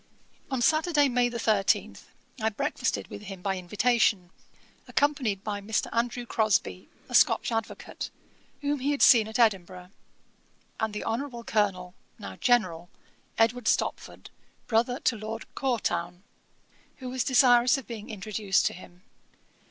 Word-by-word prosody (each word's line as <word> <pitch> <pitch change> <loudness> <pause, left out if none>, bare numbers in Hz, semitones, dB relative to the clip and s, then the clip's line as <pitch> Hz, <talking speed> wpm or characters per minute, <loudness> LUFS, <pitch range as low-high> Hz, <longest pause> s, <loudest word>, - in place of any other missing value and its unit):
On 260 -3 -1
Saturday, 310 0 +3
May 245 -1 +2
13, 220 -4 +1 0.5
I 220 - +2
breakfasted 205 - -2
with 205 - -8
him 195 -3 -9
by 195 -1 0
invitation, 200 0 +1 0.6
accompanied 265 -9 0
by 205 -1 -4
Mr. 215 +2 -1
Andrew 240 +1 -1
Crosbie, 215 - 0 0.2
a - - -11
Scotch - - +4
Advocate, 225 -1 -4 0.5
whom 290 0 -1
he 270 +3 -1
had 290 -1 +1
seen 225 -4 +7
at 220 - -4
Edinburgh, 185 -5 0 0.9
and 220 -1 -2
the - - -4
Hon. 240 0 -4
Colonel 190 -5 -1 0.2
(now 95 -1 -8
General) 180 -9 +1 0.5
Edward 230 +1 +1
Stopford, - - -2 0.3
brother 240 +3 +1
to 240 - +1
Lord 220 +1 -6
Courtown, 180 -9 -2 0.7
who 260 - -8
was 255 0 -1
desirous 250 -1 +5
of 270 - -8
being 215 -1 -8
introduced 205 -1 0
to - - +1
him. 180 0 -14
220 Hz, 135 wpm, -27 LUFS, 195-245 Hz, 0.9 s, seen